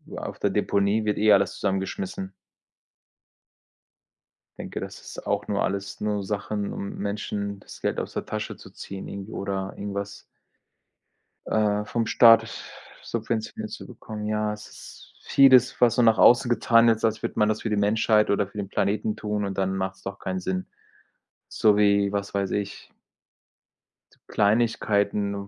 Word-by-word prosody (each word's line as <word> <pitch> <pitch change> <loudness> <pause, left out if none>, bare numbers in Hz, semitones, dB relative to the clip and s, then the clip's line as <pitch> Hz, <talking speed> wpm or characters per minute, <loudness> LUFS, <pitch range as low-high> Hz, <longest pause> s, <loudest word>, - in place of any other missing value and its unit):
auf - - -6
der - - +1
Deponie 100 +2 +1
wird 105 - 0
eh 105 0 +5
alles 100 0 +3
zusammengeschmissen. 95 -1 -3 2.3
Denke, - - -6
das - - -8
ist - - -10
auch - - -1
nur 100 -1 0
alles 100 +1 -3
nur 105 -1 -1
Sachen, 105 0 -3
um 100 - -6
Menschen 100 0 -3
das - - -13
Geld - - -1
aus - - -3
der - - -4
Tasche - - -4
zu - - -14
ziehen, 95 0 -8
irgendwie 100 +2 -7
oder 95 -1 -3
irgendwas 100 0 -5 1.3
äh, 105 -1 +1
vom 115 +1 -2
Staat 115 -1 +6 0.6
subventioniert 110 -1 -4
zu - - -8
bekommen. 110 -3 -8
Ja, 105 0 0
es 105 0 -9
ist - - -14
vieles, 135 -2 +5
was 120 0 +4
so 125 - +4
nach 115 -1 +4
außen 120 0 +6
getan 115 -1 +4
wird, 110 -1 +2
als 110 -1 +1
würde - - -4
man 105 0 +4
das 110 - -1
für 110 - -2
die 105 - +1
Menschheit 105 +1 +2
oder 100 -1 +2
für 105 - -12
den 100 -1 -4
Planeten 105 +2 -1
tun 105 -1 -2
und 100 -1 -4
dann 95 0 0
macht's 95 0 -4
doch 95 0 -6
keinen 95 0 -3
Sinn. 90 0 -3 0.8
So 105 -2 +3
wie, 100 -1 +3
was 100 -1 -3
weiß 100 -1 -1
ich 100 -1 -4 1.4
Kleinigkeiten, 100 -2 +1
105 Hz, 160 wpm, -25 LUFS, 100-110 Hz, 2.3 s, Staat